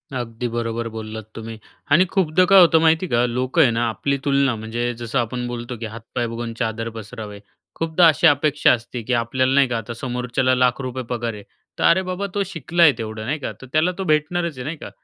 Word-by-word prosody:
अगदी 120 Hz, 0 st, -4 dB
बरोबर 115 Hz, 0 st, -3 dB
बोललात 110 Hz, 0 st, -7 dB
तुम्ही. 115 Hz, 0 st, -7 dB, 0.3 s
आणि 170 Hz, +6 st, +6 dB
खूपदा 185 Hz, -2 st, +2 dB
काय 195 Hz, -1 st, +8 dB
होतं 165 Hz, -2 st, +6 dB
माहिती 165 Hz, +3 st, +3 dB
का, 120 Hz, -4 st, +2 dB
लोकं 130 Hz, +6 st, 0 dB
आहे 130 Hz, -6 st, +5 dB
ना, 115 Hz, +1 st, 0 dB
आपली 140 Hz, +5 st, -1 dB
तुलना 140 Hz, -3 st, +2 dB
म्हणजे 120 Hz, +2 st, -3 dB
जसं 120 Hz, +3 st, -1 dB
आपण 125 Hz, +1 st, -2 dB
बोलतो 120 Hz, 0 st, -6 dB
की 115 Hz, -, -6 dB
"हातपाय 115 Hz, +2 st, -5 dB
बघून 115 Hz, 0 st, -5 dB
चादर 115 Hz, -1 st, -2 dB
पसरावे." 105 Hz, -2 st, -8 dB, 0.4 s
खूपदा 165 Hz, +1 st, +3 dB
अशी 160 Hz, +2 st, +4 dB
अपेक्षा 145 Hz, 0 st, +3 dB
असते 120 Hz, +1 st, -5 dB
की 125 Hz, -, -2 dB
आपल्याला 130 Hz, +3 st, +1 dB
नाही 140 Hz, -1 st, +4 dB
का, 120 Hz, -, -1 dB
आता 115 Hz, +1 st, -6 dB
समोरच्याला 125 Hz, +1 st, -1 dB
लाख 125 Hz, +1 st, +2 dB
रुपये 130 Hz, 0 st, -4 dB
पगार 120 Hz, -1 st, -2 dB
आहे, 105 Hz, -1 st, -10 dB, 0.4 s
तर -, -, 0 dB
अरे 180 Hz, +3 st, +5 dB
बाबा, 185 Hz, +2 st, -3 dB
तो 200 Hz, -, +1 dB
शिकला 170 Hz, -1 st, 0 dB
आहे 155 Hz, -, +8 dB
तेवढं, 110 Hz, -1 st, -5 dB
नाही 150 Hz, +6 st, -2 dB
का? 140 Hz, -, -4 dB
तर 130 Hz, -, -10 dB
त्याला 155 Hz, +4 st, +3 dB
तो 195 Hz, -, -3 dB
भेटणारच 160 Hz, -1 st, 0 dB
आहे, 125 Hz, -, -5 dB
नाही 155 Hz, +1 st, -4 dB
का? -, -, -9 dB
125 Hz, 215 wpm, -21 LUFS, 115-155 Hz, 0.4 s, काय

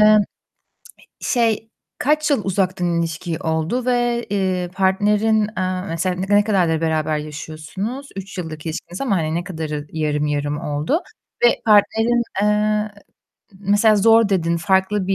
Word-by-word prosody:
e 215 Hz, 0 st, +7 dB, 1.0 s
şey, 225 Hz, -2 st, 0 dB, 0.3 s
kaç 305 Hz, +2 st, +2 dB
yıl 245 Hz, -7 st, +2 dB
uzaktan 180 Hz, -3 st, 0 dB
ilişki 165 Hz, 0 st, -3 dB
oldu 160 Hz, +10 st, -1 dB
ve, 240 Hz, -1 st, +1 dB
eee, 185 Hz, -3 st, -1 dB
partnerin, 210 Hz, +3 st, +2 dB, 0.2 s
eee, 185 Hz, 0 st, -1 dB
mesela 180 Hz, +2 st, -1 dB
ne 195 Hz, +3 st, 0 dB
ne 205 Hz, -, +5 dB
kadardır 175 Hz, -6 st, +1 dB
beraber 155 Hz, -1 st, 0 dB
yaşıyorsunuz? 155 Hz, -, -6 dB
3 195 Hz, 0 st, -7 dB
yıllık 160 Hz, -2 st, -7 dB
ilişkiniz 170 Hz, +4 st, -5 dB
ama 210 Hz, -9 st, +1 dB
hani 160 Hz, 0 st, -1 dB
ne 175 Hz, -, -1 dB
kadarı 155 Hz, -5 st, -5 dB
yarım 150 Hz, -1 st, 0 dB
yarım 145 Hz, 0 st, -1 dB
oldu 150 Hz, -, -1 dB, 0.4 s
ve 240 Hz, -, +3 dB
partnerin, 225 Hz, +3 st, +4 dB, 0.2 s
eee, 210 Hz, 0 st, +1 dB, 0.7 s
mesela 205 Hz, +2 st, +4 dB
zor 225 Hz, +1 st, +5 dB
dedin, 170 Hz, -4 st, +1 dB
farklı 190 Hz, +2 st, +1 dB
bir 195 Hz, -, +1 dB
190 Hz, 140 wpm, -20 LUFS, 160-215 Hz, 1.0 s, e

